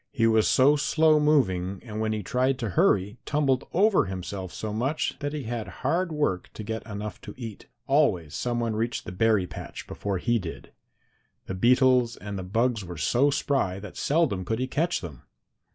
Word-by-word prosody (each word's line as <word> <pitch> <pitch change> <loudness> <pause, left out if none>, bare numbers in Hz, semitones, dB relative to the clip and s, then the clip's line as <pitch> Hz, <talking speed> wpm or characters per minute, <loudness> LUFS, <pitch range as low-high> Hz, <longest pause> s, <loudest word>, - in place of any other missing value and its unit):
He 115 -5 +1
was 110 -1 +4
so 140 +3 +5
slow 155 +1 +3
moving, 100 -11 +2
and 110 -2 -6
when 110 0 0
he 105 -1 -2
tried 130 0 +1
to 115 -4 -3
hurry 100 +5 +2
tumbled 140 -3 +1
over 200 - +4
himself 95 0 -5
so 110 -1 -5
much, 130 +8 -1
that 145 0 -3
he 150 -2 -4
had 115 -3 -4 0.2
hard 170 +5 +1
work 145 -13 -1
to 110 - -6
get 110 +1 -4
enough 105 0 -6
to - - -9
eat. 115 -5 -8 0.2
Always 105 - +2
some 120 -1 -1
one 115 -2 -1
reached 115 +2 -2
the - - -6
berry 105 +1 +2
patch - - -8
before 100 -2 -3
he 120 +5 +1
did. 85 -4 -8 0.7
The - - -5
beetles 125 +3 +3
and 100 0 -6
the 95 - -4
bugs 115 +4 0
were 90 -2 -8
so 120 - +3
spry 135 -9 0
that 100 -1 -10
seldom 145 - +1
could 110 +5 -2
he 130 - -1
catch 160 +6 0
them. 80 -8 -8
115 Hz, 190 wpm, -26 LUFS, 100-135 Hz, 0.7 s, so